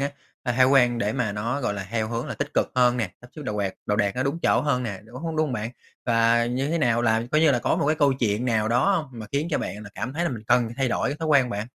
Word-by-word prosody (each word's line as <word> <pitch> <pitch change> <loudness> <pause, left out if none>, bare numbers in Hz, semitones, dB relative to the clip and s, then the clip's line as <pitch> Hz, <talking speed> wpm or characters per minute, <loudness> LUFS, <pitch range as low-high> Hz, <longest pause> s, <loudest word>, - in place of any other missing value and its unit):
á, 140 +1 -1 0.3
cái 125 -2 0
thói 130 - +6
quen 125 -3 +4
để 105 -2 0
mà 115 -5 -1
nó, 115 +7 -2
gọi 120 -5 -1
là, 95 -2 -5
theo 110 -1 -1
hướng 115 +1 -3
là - - -4
tích 145 +1 -4
cực - - +2
hơn 125 -1 +4
nè, 110 -7 -1
sắp 120 - -15
xếp 150 - -6
đồ 130 - -3
quạt 100 -2 -2
đồ 105 - +1
đạc 100 -2 0
nó 130 - +1
đúng 140 +5 -1
chỗ - - +3
hơn 140 -4 0
nè, 100 -6 -5
đúng 115 +3 -12
h - - -3
đúng 165 -1 -3
hông 155 -3 +1
bạn? 110 -1 -3 0.4
Và 115 0 +3
như 130 +3 -1
thế 170 - 0
nào 120 -4 +2
là 110 -1 +2
coi 155 - +4
như 160 -2 +5
là, 125 - +2
có - - 0
một - - 0
cái 155 +1 +2
câu 145 -3 +4
chuyện 115 -3 0
nào 110 -3 +1
đó 125 - +3
hông 155 -6 -4
mà 110 - -7
khiến 145 +4 0
cho - - +1
bạn 105 - -5
là 100 - -10
cảm 125 +3 -4
thấy 170 +4 -1
là - - 0
mình 115 -4 -6
cần 120 0 +3
phải 115 - -7
thay 135 -2 +1
đổi - - 0
cái 145 - -3
thói 160 -1 -3
quen 135 -4 +4
bạn? 105 -1 -3
120 Hz, 330 wpm, -25 LUFS, 110-140 Hz, 0.4 s, thói